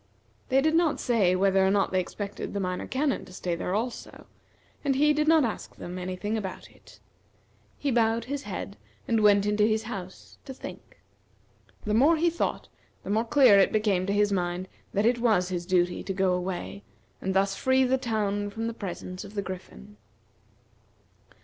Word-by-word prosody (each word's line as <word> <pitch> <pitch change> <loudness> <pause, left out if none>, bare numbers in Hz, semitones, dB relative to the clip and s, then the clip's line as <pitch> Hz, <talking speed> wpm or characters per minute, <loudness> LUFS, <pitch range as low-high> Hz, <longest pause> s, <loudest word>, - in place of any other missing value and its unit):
They 265 0 +4
did 315 +2 +2
not 330 -2 +2
say 205 -8 +2
whether 190 0 +3
or 190 - +3
not 200 -1 +2
they 185 - +2
expected 200 +3 -5
the - - 0
Minor 180 -1 -3
Canon 275 +1 -1
to - - -15
stay 180 -1 -3
there 180 +2 -2
also, 235 +3 -5 0.6
and 275 -2 +1
he 300 +2 +4
did 300 +1 0
not 320 -3 +5
ask 225 - -5
them 180 +1 -7
any 185 0 -4
thing 210 +4 -2
about 190 -3 -7
it. - - -19 0.8
He 285 - -1
bowed 230 -1 +2
his 280 +2 -4
head, 200 -3 -6 0.3
and 225 -1 +2
went 205 -1 +5
into 210 0 +2
his 220 +1 +2
house, 190 -5 -8
to 265 -2 -8
think. - - -11 0.9
The 210 - 0
more 285 +9 +5
he 340 +2 +2
thought, 340 - -2 0.4
the - - -4
more 220 +3 +1
clear 235 -5 +6
it 195 - +4
became 205 -4 +1
to 200 - 0
his 205 0 +2
mind 180 -1 -1 0.2
that 205 +2 +1
it 240 +1 +3
was 215 -7 +2
his 175 -1 -4
duty 180 -2 +1
to 195 - -2
go 190 -1 +1
away, 175 - -4 0.4
and 190 0 -2
thus 195 0 +2
free 260 +3 +2
the 260 +1 +2
town 205 -4 -1
from 225 +3 -5
the 230 - -2
presence 185 -3 -6
of 200 +1 -12
the 200 - -1
Griffin. 105 - -9
205 Hz, 190 wpm, -27 LUFS, 185-240 Hz, 0.9 s, clear